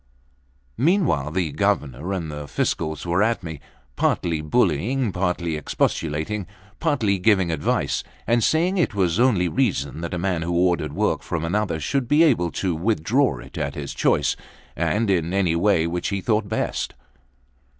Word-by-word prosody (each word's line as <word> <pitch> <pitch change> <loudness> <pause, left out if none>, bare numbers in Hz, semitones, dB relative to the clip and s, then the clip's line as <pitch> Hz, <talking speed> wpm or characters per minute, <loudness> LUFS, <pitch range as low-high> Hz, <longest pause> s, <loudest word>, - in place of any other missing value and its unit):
Meanwhile, 155 - +2
the 85 -1 -1
Governor 75 -2 -1
and 85 -5 -3
the 75 -1 -6
Fiscal 80 +2 -1
were 85 +2 +1
at 115 -1 +1
me, 80 -3 -6 0.4
partly 80 -3 0
bullying, 105 - +1
partly 90 -3 -1
expostulating, 80 +5 -1 0.3
partly 115 - +1
giving 95 -3 +3
advice, 75 -2 0 0.2
and 120 0 +2
saying 180 +4 +2
it 155 - +1
was 95 -1 +1
only 110 -8 +3
reason 85 - -1
that 85 +1 -3
a - - -2
man 90 -1 -1
who 85 +1 -2
ordered 85 -5 +1
work - - 0
from 80 -1 -3
another 90 -2 -1
should 125 - -1
be 150 +5 +5
able 115 - +3
to 95 -3 -1
withdraw 105 - +1
it - - -9
at 70 0 -2
his 70 -1 -5
choice, - - +2 0.4
and 105 -1 +1
in 85 0 0
any 90 -4 +2
way 85 -2 +3
which 85 +1 -2
he 100 0 -1
thought 105 +1 0
best. 110 - -2
90 Hz, 160 wpm, -23 LUFS, 80-110 Hz, 0.4 s, be